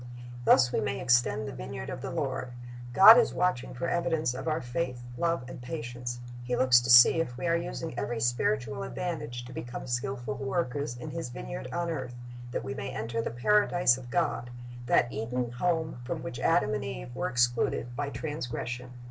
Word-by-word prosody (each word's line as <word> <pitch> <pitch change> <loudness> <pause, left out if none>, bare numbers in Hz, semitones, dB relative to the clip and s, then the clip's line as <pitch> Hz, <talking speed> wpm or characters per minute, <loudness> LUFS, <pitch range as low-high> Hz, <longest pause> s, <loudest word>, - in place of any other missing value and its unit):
Thus 120 +1 +6
we - - +1
may 135 -1 -2
extend 120 -4 +2
the - - -5
vineyard 60 0 -6
of - - -6
the - - -4
Lord. 125 -1 -3 0.4
God 210 - +10
is 240 - +1
watching 180 -10 0
for 170 - -2
evidence 165 -6 0
of 130 +3 -6
our 155 0 +1
faith, 125 -1 -3
love, 165 0 0
and 130 - -9
patience. 120 -2 -5 0.2
He 125 0 -1
looks 125 -1 +5
to 120 - -4
see 120 +6 +8
if 125 -7 -5
we - - -4
are" 170 0 +3
using 170 -1 -4
every 115 +3 -2
spiritual 120 +2 0
advantage 150 -9 -4
to 125 - -10
become 120 0 -6
skilful 120 -2 -3
workers 135 -2 -2
in 150 +5 -7
His 165 -6 -4
vineyard - - -6
on 170 -1 -1
earth, 130 -6 -5 0.3
that - - -3
we 135 - -4
may 135 - -5
enter 115 +1 -3
the - - -2
Paradise 175 - +3
of 125 -1 -10
God, 150 -6 0 0.4
that 120 - +3
Eden 120 +2 -2
home 160 +2 -1
from 120 - -4
which 120 - -6
Adam 165 -11 +2
and 105 - -2
Eve - - -6
were - - -1
excluded 120 0 +1
by 145 +1 -2
transgression. 125 -3 -5
125 Hz, 190 wpm, -29 LUFS, 120-155 Hz, 0.4 s, God